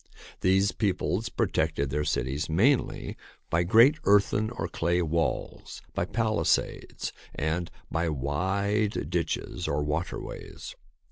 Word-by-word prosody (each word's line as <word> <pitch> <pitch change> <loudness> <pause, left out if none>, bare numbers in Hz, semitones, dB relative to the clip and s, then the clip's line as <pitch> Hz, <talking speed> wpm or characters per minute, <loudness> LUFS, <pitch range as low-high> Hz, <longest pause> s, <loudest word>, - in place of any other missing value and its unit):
These 95 +2 +3
peoples 105 +1 -1
protected 70 -10 0
their 75 +2 0
cities 65 +5 -1
mainly 115 - +2 0.4
by 85 - +3
great 115 - +6
earthen 105 +1 +3
or 115 -8 -4
clay 85 +1 0
walls, 80 +1 -2
by - - 0
palisades, 110 +2 0 0.2
and 85 +3 -1 0.2
by 85 0 0
wide 95 +9 -1
ditches - - -2
or 75 +1 0
waterways. 75 +4 -5
90 Hz, 110 wpm, -28 LUFS, 80-105 Hz, 0.4 s, great